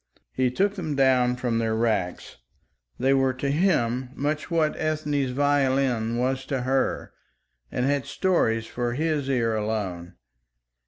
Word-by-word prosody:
He 130 -1 +1
took 195 +11 +1
them 165 -7 -4
down 130 -2 +3
from 120 -2 -1
their 110 -1 0
racks. 110 -6 -1 0.6
They 135 +2 +2
were 135 -1 +2
to 140 +2 -2
him 130 -7 +1
much 150 +4 -2
what 160 -3 +1
Ethne's 150 -3 -1
violin 130 -4 +1
was 130 +2 0
to 135 -2 -1
her 130 +2 -1 0.6
and 125 - -1
had 140 0 0
stories 115 -12 +1
for 120 +1 -3
his 150 -1 -1
ear 115 -4 +1
alone. 95 -5 -3
130 Hz, 140 wpm, -25 LUFS, 120-145 Hz, 0.6 s, down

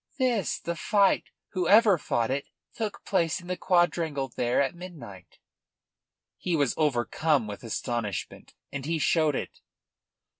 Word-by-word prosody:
"This. 245 - +1
The 170 - -4
fight 200 +3 +3 0.2
whoever 195 +1 +5
fought 120 -4 0
it 140 +1 -2 0.3
took 220 -2 -4
place 170 -3 +1
in 175 - -13
the 180 +1 -2
quadrangle 170 -6 +1
there 120 +1 0
at 135 -2 +1
midnight." 150 - -11 1.0
He 175 - -1
was 140 -6 +2
overcome 145 -1 +1
with 105 +1 -7
astonishment, 115 -3 -4 0.2
and 140 -1 -5
he 165 0 0
showed 155 -1 +2
it. - - -5
160 Hz, 135 wpm, -27 LUFS, 130-180 Hz, 1.0 s, whoever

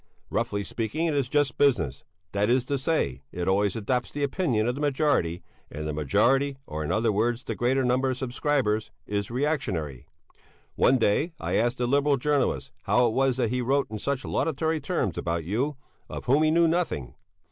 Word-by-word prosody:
Roughly 105 -3 -1
speaking 115 - -2
it 160 - +1
is 140 -3 0
just 145 -3 +1
business, 125 - +2 0.3
that 100 +2 +1
is 125 0 +2
to 140 +1 -1
say, 125 - -1
it 90 0 -4
always 100 0 +2
adopts 120 +3 -1
the 145 - -4
opinion 135 - 0
of 120 - +1
the 140 - -6
majority, 140 - +1 0.3
and 75 +1 -5
the 75 - -2
majority, 130 - +2
or, 75 +1 -4
in 75 - -2
other 110 0 +2
words, 115 +4 0
the - - -3
greater 130 +2 +1
number 130 +2 +2
of 130 - -2
subscribers, 125 -4 0 0.2
is 100 -1 -2
reactionary. 115 - -2 0.7
One 130 - +4
day 135 - +1
I - - -3
asked 120 +3 +1
a 125 - +1
Liberal 140 +2 +2
journalist 145 0 0
how 125 0 +4
it 115 - +1
was 135 0 +2
that 120 -3 0
he 125 0 0
wrote 135 -1 +1
in 110 - -4
such 140 +2 -2
laudatory 160 +1 0
terms 135 - -1
about 85 -1 -2
you, 125 - -1 0.3
of - - -6
whom 140 +4 +4
he 155 - +4
knew 165 +1 +4
nothing. 165 - -1
125 Hz, 190 wpm, -26 LUFS, 105-140 Hz, 0.7 s, One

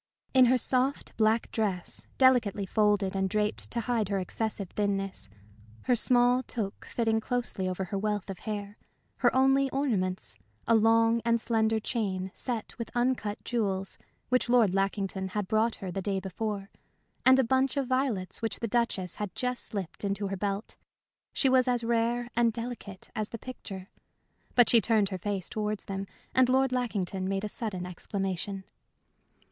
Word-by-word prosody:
In 260 -1 +7
her 255 +1 +4
soft, 260 +3 +1
black 220 +1 +2
dress, 195 -5 -2
delicately 240 -6 +4
folded 205 -1 +2
and 190 0 +1
draped 210 +1 -1
to 235 - -1
hide 225 -4 0
her 200 - 0
excessive 200 0 -3
thinness, 195 - -2 0.5
her 250 - +3
small 245 +1 +4
toque 220 -5 -4
fitting 225 -2 +1
closely 235 -6 -1
over 185 +1 -2
her 195 +2 -3
wealth 210 -1 -1
of 195 -2 -6
hair, 205 -1 -5 0.4
her - - +4
only 270 +1 +4
ornaments 210 -10 -1 0.3
a 230 - +4
long 225 +1 +4
and 235 0 +2
slender 220 -1 +1
chain 190 -5 -2
set 235 -4 -4
with 230 - -4
uncut 240 -4 0
jewels 195 -5 -1 0.3
which 250 -1 +2
Lord 235 -6 +5
Lackington 195 -1 -1
had 205 0 -3
brought 220 +2 +2
her 190 -2 -6
the 195 - -3
day 195 0 -1
before, 200 +1 -4 0.5
and 260 0 +7
a 265 - +4
bunch 260 +3 +1
of 275 - +1
violets 255 -8 -1
which 225 -2 -2
the 230 - -1
Duchess 205 -6 -1
had 205 -3 -4
just 250 -1 -2
slipped 195 -4 -5
into 200 0 -1
her 195 - -2
belt, 200 +2 -3 0.5
she 275 - +2
was 260 -1 +4
as 245 -1 +1
rare 235 +1 +1
and 235 -1 +4
delicate 230 -4 -6
as 215 -1 -1
the 230 - -6
picture. 200 -6 -8 0.6
But 245 -2 +7
she 230 - +6
turned 215 -4 +3
her 190 -2 -4
face 195 -1 -2
towards 210 -1 -2
them, 195 0 -4 0.3
and 255 -1 +4
Lord 265 0 +3
Lackington 195 -7 -1
made 195 0 -1
a - - -1
sudden 200 -6 -3
exclamation. 195 +1 -3
215 Hz, 165 wpm, -29 LUFS, 195-240 Hz, 0.6 s, In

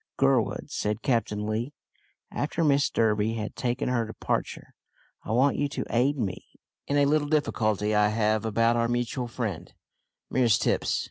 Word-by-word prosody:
"Gurwood," - - +1
said 105 +2 -2
Captain 105 -4 0
Lee, 115 +6 -2 0.6
after 155 +3 -2
Mrs 140 -2 +3
Durby 110 0 +1
had 110 -1 -5
taken 125 0 -2
her 125 -2 +1
departure, 110 - -4 0.5
"I - - -10
want 130 +5 +3
you 145 0 0
to - - -4
aid 130 +5 +2
me 105 -7 -3 0.4
in 145 - +1
a 145 - +4
little 145 +1 +2
difficulty 110 -8 +1
I 105 0 +4
have 110 0 +1
about 115 +1 +2
our 115 0 +1
mutual 120 +1 -2
friend, 120 - -4 0.6
Mrs 120 -4 +3
Tipps. - - +1
115 Hz, 155 wpm, -27 LUFS, 110-135 Hz, 0.6 s, a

